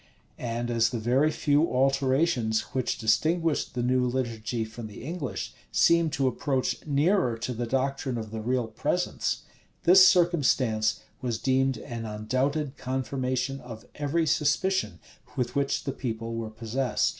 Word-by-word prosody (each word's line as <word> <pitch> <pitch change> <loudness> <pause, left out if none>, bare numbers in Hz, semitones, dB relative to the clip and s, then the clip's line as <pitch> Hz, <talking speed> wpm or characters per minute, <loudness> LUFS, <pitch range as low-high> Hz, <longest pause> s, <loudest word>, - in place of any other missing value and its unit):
And 120 0 -3
as 115 -1 +3
the 120 - -3
very 125 +7 +2
few 150 +1 +2
alterations 135 -3 +2
which 130 -2 -1
distinguished 155 +9 +1
the 120 - -1
new 125 +1 +2
liturgy 115 -2 -2
from 110 0 -8
the 105 +1 -10
English, 155 -2 -4 0.2
seemed 170 -2 +4
to 140 -4 +1
approach 130 +1 -1
nearer 145 - +2
to 125 +2 -3
the 120 0 -3
doctrine 135 0 -1
of 110 -2 -6
the 110 -1 -4
real 125 +2 0
presence, 110 - -1 0.4
this 185 +2 +8
circumstance 130 - +2 0.2
was 120 -3 -1
deemed 130 0 +1
an 115 +1 -6
undoubted 130 +7 -1
confirmation 130 +1 -2
of 115 -3 -10
every 150 +3 0
suspicion 155 - +1 0.4
with 125 -2 -1
which 140 0 0
the 135 - -2
people 115 -2 -4
were 115 -1 -4
possessed. 115 +4 -1
130 Hz, 145 wpm, -27 LUFS, 115-140 Hz, 0.4 s, this